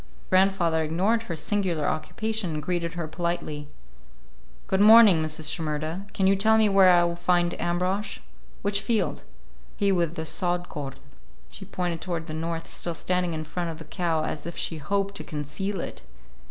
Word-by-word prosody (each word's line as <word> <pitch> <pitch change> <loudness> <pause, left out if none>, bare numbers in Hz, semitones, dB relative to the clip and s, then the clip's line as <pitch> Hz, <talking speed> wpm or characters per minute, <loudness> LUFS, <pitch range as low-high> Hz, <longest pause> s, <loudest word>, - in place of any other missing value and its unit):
Grandfather 185 -4 +3
ignored 190 +9 +1
her 180 -7 -5
singular 175 -2 -1
occupation 185 +4 -2
and 150 - -4
greeted 175 0 -2
her 170 -2 -3
politely. 170 -3 -3 1.0
"Good 190 - +1
morning, 215 -5 +8
Mrs. 155 -1 -2
Shimerda. 160 +4 -3
Can 195 - 0
you 195 +1 +5
tell 220 +3 +4
me 220 -1 +5
where 195 -1 +6
I 175 -1 +6
will 170 0 0
find 175 0 +1
Ambrosch? 180 +4 -1 0.5
Which 200 0 +2
field?" 210 -2 0 0.6
"He 200 -1 +2
with 170 -3 +1
the 160 - -4
sod 175 +2 -1
corn." 135 -2 -6 0.6
She 195 - -9
pointed 175 -3 -3
toward 170 -3 -3
the 155 - -6
north, 165 +1 -3
still 170 0 -3
standing 180 -1 -1
in 155 - -4
front 170 +2 -4
of 160 - -6
the 160 - -10
cow 160 0 -1
as 155 - -5
if 170 - -7
she 165 - -2
hoped 195 +6 -1
to - - -5
conceal 155 +7 -4
it. - - -5
175 Hz, 175 wpm, -26 LUFS, 160-195 Hz, 1.0 s, morning